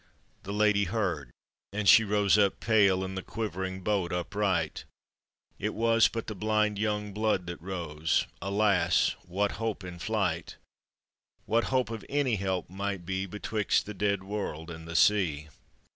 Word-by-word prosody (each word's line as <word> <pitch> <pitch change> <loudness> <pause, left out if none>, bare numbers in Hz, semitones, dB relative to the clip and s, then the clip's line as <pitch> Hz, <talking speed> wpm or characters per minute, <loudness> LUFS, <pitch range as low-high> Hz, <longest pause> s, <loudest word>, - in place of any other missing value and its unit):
The 100 - -7
lady 105 -1 +3
heard, 90 - -2 0.4
and 105 0 -2
she 110 - +8
rose 105 -1 +3
up 100 -2 +3
pale, 100 -4 +3
In 95 0 -4
the 95 - -4
quivering 95 -2 -4
boat 100 -4 0
upright; 90 -2 -1 0.8
It 105 +2 -2
was 115 0 +4
but 115 -1 -5
the 110 - -5
blind 105 0 0
young; 105 -1 -1
blood 105 -3 0
that 85 -2 -7
rose, 80 -4 -1 0.2
Alas! 100 -3 +2
what 100 +3 0
hope 110 -3 -2
in 90 -1 -8
flight, 95 -5 -1 0.9
What 115 +2 +2
hope 130 -3 0
of 110 -2 -5
any 135 -6 +1
help 95 -2 -2
might 95 -1 -4
be 95 +1 -2
Betwixt 105 +2 0
the 105 - -6
dead 100 0 0
world 95 -5 -4
and 80 0 -9
the 80 - -6
sea? 80 -7 +3
100 Hz, 155 wpm, -29 LUFS, 90-105 Hz, 0.9 s, she